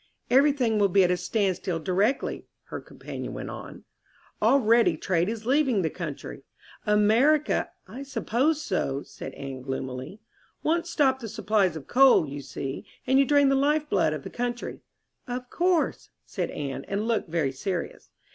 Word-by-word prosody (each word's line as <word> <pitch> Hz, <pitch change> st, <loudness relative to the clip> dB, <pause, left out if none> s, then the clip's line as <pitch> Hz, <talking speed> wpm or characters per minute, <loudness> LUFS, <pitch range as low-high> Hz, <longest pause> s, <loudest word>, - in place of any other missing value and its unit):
"Everything 265 Hz, -5 st, +4 dB
will 200 Hz, -1 st, +4 dB
be 195 Hz, +1 st, +5 dB
at 180 Hz, -, +3 dB
a -, -, +3 dB
standstill 185 Hz, -1 st, -1 dB
directly," 190 Hz, -, 0 dB, 0.2 s
her -, -, -5 dB
companion -, -, -8 dB
went -, -, -5 dB
on. -, -, -9 dB, 0.6 s
"Already 230 Hz, -, +4 dB
trade 175 Hz, +2 st, 0 dB
is 225 Hz, -1 st, -5 dB
leaving 260 Hz, -6 st, +2 dB
the 160 Hz, -, 0 dB
country. 155 Hz, -5 st, -6 dB, 0.5 s
America 225 Hz, +9 st, +3 dB
" -, -, -37 dB
"I 265 Hz, -, -8 dB
suppose 280 Hz, +2 st, 0 dB
so," 140 Hz, -7 st, -1 dB
said -, -, -9 dB
Anne 135 Hz, -2 st, -7 dB
gloomily. 130 Hz, +6 st, -5 dB, 0.4 s
"Once 335 Hz, +2 st, 0 dB
stop 270 Hz, -5 st, +2 dB
the 230 Hz, -3 st, -6 dB
supplies 195 Hz, -4 st, +1 dB
of 155 Hz, -, -7 dB
coal, 260 Hz, -, +5 dB
you 140 Hz, +1 st, -6 dB
see, 135 Hz, 0 st, -5 dB, 0.2 s
and 265 Hz, +1 st, +4 dB
you 275 Hz, -, +5 dB
drain 285 Hz, 0 st, +4 dB
the 275 Hz, -, +3 dB
life 295 Hz, +2 st, +2 dB
blood 175 Hz, -5 st, +3 dB
of 150 Hz, -2 st, -4 dB
the -, -, -8 dB
country." 240 Hz, 0 st, -4 dB, 0.5 s
"Of 250 Hz, 0 st, -5 dB
course," 355 Hz, -2 st, +1 dB, 0.2 s
said -, -, -3 dB
Anne, 135 Hz, -2 st, -4 dB
and 205 Hz, +3 st, -2 dB
looked 225 Hz, -7 st, 0 dB
very 155 Hz, -5 st, 0 dB
serious. 175 Hz, +7 st, -4 dB
215 Hz, 165 wpm, -26 LUFS, 165-270 Hz, 0.6 s, be